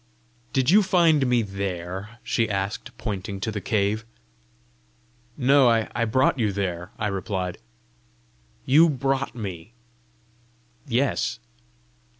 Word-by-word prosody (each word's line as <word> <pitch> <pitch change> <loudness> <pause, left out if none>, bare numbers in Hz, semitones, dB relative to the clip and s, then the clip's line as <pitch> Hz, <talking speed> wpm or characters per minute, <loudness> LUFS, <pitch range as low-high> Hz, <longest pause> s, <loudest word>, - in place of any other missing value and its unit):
"Did 130 +2 +2
you 210 +3 +7
find 170 -8 +3
me 120 -2 +2
there?" 95 +1 -5
she 115 -2 0
asked, 100 0 -3
pointing 100 -2 -4
to 110 - -2
the 105 -1 -4
cave. 105 +2 0 1.3
"No; 135 -1 +5
I 115 0 +1
brought 130 +4 +2
you 110 -3 +1
there," 90 -2 -3
I 110 - -2
replied. 95 -2 -3 1.1
"You 155 +6 +6
brought 135 -1 -1
me?" 100 -2 -7 1.1
"Yes." 125 0 0
110 Hz, 110 wpm, -24 LUFS, 100-130 Hz, 1.3 s, you